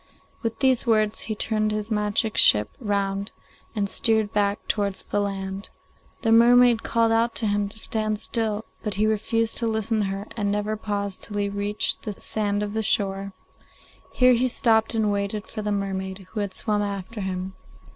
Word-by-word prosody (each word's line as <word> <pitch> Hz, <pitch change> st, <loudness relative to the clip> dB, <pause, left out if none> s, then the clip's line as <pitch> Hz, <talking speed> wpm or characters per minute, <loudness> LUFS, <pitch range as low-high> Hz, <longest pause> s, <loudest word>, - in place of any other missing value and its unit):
With 225 Hz, -1 st, -3 dB
these 260 Hz, -2 st, +2 dB
words 215 Hz, -2 st, +2 dB
he 215 Hz, -, -4 dB
turned 215 Hz, 0 st, 0 dB
his 215 Hz, +1 st, -3 dB
magic 210 Hz, +1 st, +1 dB
ship 105 Hz, 0 st, +6 dB
round 200 Hz, -2 st, -1 dB, 0.4 s
and 205 Hz, -2 st, 0 dB
steered 220 Hz, +1 st, +1 dB
back 205 Hz, 0 st, 0 dB
towards 200 Hz, -2 st, -1 dB
the -, -, -2 dB
land. 195 Hz, 0 st, -4 dB, 0.5 s
The 225 Hz, -, +2 dB
mermaid 240 Hz, 0 st, +6 dB
called 230 Hz, -1 st, +1 dB
out 230 Hz, +1 st, +2 dB
to 225 Hz, -, -1 dB
him 205 Hz, -1 st, 0 dB
to 215 Hz, -, -9 dB
stand 215 Hz, -1 st, -2 dB
still, 220 Hz, -1 st, -2 dB, 0.2 s
but 210 Hz, -3 st, -3 dB
he 210 Hz, +2 st, +2 dB
refused 220 Hz, +1 st, 0 dB
to 230 Hz, -, 0 dB
listen 220 Hz, 0 st, 0 dB
to 210 Hz, -, +1 dB
her 195 Hz, +2 st, -4 dB
and 205 Hz, -2 st, -1 dB
never 210 Hz, +1 st, -1 dB
paused 200 Hz, -2 st, -3 dB
till 205 Hz, -, -6 dB
he 200 Hz, 0 st, 0 dB
reached 205 Hz, +1 st, -1 dB
the 210 Hz, -, -5 dB
sand 205 Hz, 0 st, -2 dB
of 205 Hz, 0 st, -4 dB
the 220 Hz, -, 0 dB
shore. 195 Hz, -2 st, 0 dB, 0.8 s
Here 250 Hz, 0 st, +5 dB
he 250 Hz, +2 st, +2 dB
stopped 225 Hz, -2 st, +2 dB
and 215 Hz, -2 st, +2 dB
waited 200 Hz, +1 st, -2 dB
for 215 Hz, -, -6 dB
the 210 Hz, 0 st, -2 dB
mermaid, 190 Hz, -1 st, -3 dB
who 220 Hz, -, -4 dB
had 200 Hz, -2 st, -3 dB
swum 210 Hz, -1 st, 0 dB
after 205 Hz, +2 st, -4 dB
him. 190 Hz, 0 st, -4 dB
210 Hz, 185 wpm, -24 LUFS, 200-225 Hz, 0.8 s, ship